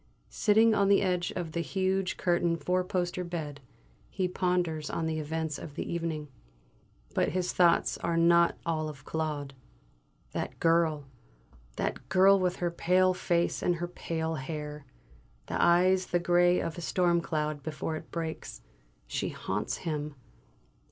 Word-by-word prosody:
Sitting 220 +1 +4
on 200 -2 +3
the 200 0 +5
edge 180 -2 0
of 175 -3 -3
the 170 - -2
huge 190 +2 -1
curtained 175 -1 +1
four 180 0 +1
poster 180 -1 -2
bed, 155 -5 -5 0.5
he 185 -2 -1
ponders 180 -4 -1
on 165 - -2
the 160 -1 -1
events 160 0 -3
of 145 - -9
the - - -4
evening. 165 -3 -3 0.9
But 145 - +1
his 180 -1 -1
thoughts 170 -2 +3
are 170 0 -1
not 170 0 +4
all 155 -2 -1
of 140 -2 -11
Claude. 150 -3 -3 0.8
That - - -4
girl 165 -3 +2 0.7
that - - -3
girl 195 +1 +6
with 180 -1 +1
her 175 -1 -1
pale 185 +2 +3
face 175 -1 0
and 175 - +2
her 175 +1 -3
pale 165 -2 -3
hair, 150 -1 -6 0.6
and - - -1
eyes 185 +2 +4
the 175 - +1
grey 175 +1 +4
of 165 +1 -4
a - - -6
storm 175 0 +2
cloud 155 -3 -2
before 155 +2 -4
it - - -8
breaks, 165 -1 -5 0.4
she - - -2
haunts 105 +2 -3
him! 150 -2 -3
170 Hz, 150 wpm, -29 LUFS, 155-180 Hz, 0.9 s, girl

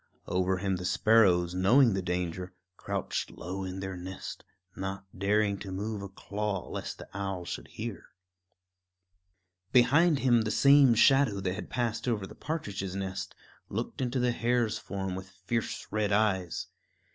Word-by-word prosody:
Over 95 +1 +1
him 95 0 -1
the 90 - -6
sparrows, 90 -4 +4
knowing 115 +6 +5
the 95 - -1
danger, 90 0 -3 0.2
crouched - - -3
low 95 +2 -6
in 95 0 -5
their 95 -1 -4
nest, 90 +1 -7 0.3
not 95 0 -4
daring 100 +1 +1
to 95 - -7
move 105 +2 -3
a 100 - -6
claw 100 0 -3
lest - - -5
the - - -10
owl 95 -2 -3
should - - -5
hear. 110 -4 -6 1.6
Behind 145 +6 +5
him 125 -3 +4
the 110 - -1
same 140 -1 +6
shadow 135 -3 +5
that 90 -1 -1
had - - -6
passed 115 -1 -2
over 110 -5 0
the - - -11
partridge's 100 - -4
nest 95 -1 -4 0.3
looked - - -4
into 130 0 -1
the 125 0 +2
hare's 115 -2 +1
form 95 -1 -4
with 95 0 -7
fierce 95 +5 -3
red 105 -1 0
eyes. 100 -4 +1
100 Hz, 155 wpm, -30 LUFS, 95-115 Hz, 1.6 s, same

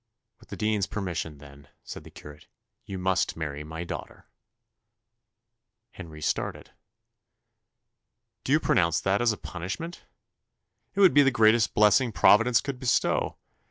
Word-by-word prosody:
"With - - -21
the - - -7
dean's 105 -3 0
permission, 85 -6 -4
then," 70 0 -15 0.2
said - - -9
the - - -13
curate, 75 +1 -13 0.4
"you 95 - -5
must 90 -3 0
marry 75 -2 -5
my 80 +2 -7
daughter." 85 - -8 1.7
Henry 80 -8 -10
started - - -3 1.7
"Do - - -4
you 150 - +5
pronounce 85 - +2
that 95 +3 0
as 120 -1 +3
a 105 - -5
punishment? 95 - -7 0.9
It 200 - +1
would 190 - +6
be 145 - +6
the 135 - +4
greatest 110 -2 +3
blessing 105 +4 +4
Providence 115 +3 +4
could 135 -3 -6
bestow. 125 -3 0
95 Hz, 135 wpm, -26 LUFS, 80-120 Hz, 1.7 s, would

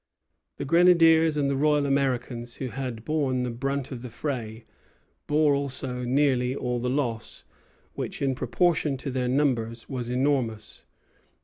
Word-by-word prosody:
The - - -4
grenadiers 165 -1 +5
and 140 -1 +1
the 140 - 0
Royal 150 +1 +2
Americans, 125 -3 -1
who 130 - -4
had 125 -3 -5
borne 140 -5 0
the 125 - -2
brunt 135 +3 -3
of 125 -3 -6
the 125 - -7
fray, 115 -3 -5 0.6
bore 150 -1 +3
also 130 -2 -3
nearly 130 -1 +1
all 125 -2 -2
the 125 +1 -1
loss; 125 -5 -3 0.5
which, - - -5
in 135 -1 +1
proportion 155 0 +1
to 135 +1 -5
their 125 -1 -1
numbers, 120 -4 0
was 125 -3 -4
enormous. 125 -4 -1
130 Hz, 145 wpm, -26 LUFS, 125-145 Hz, 0.6 s, grenadiers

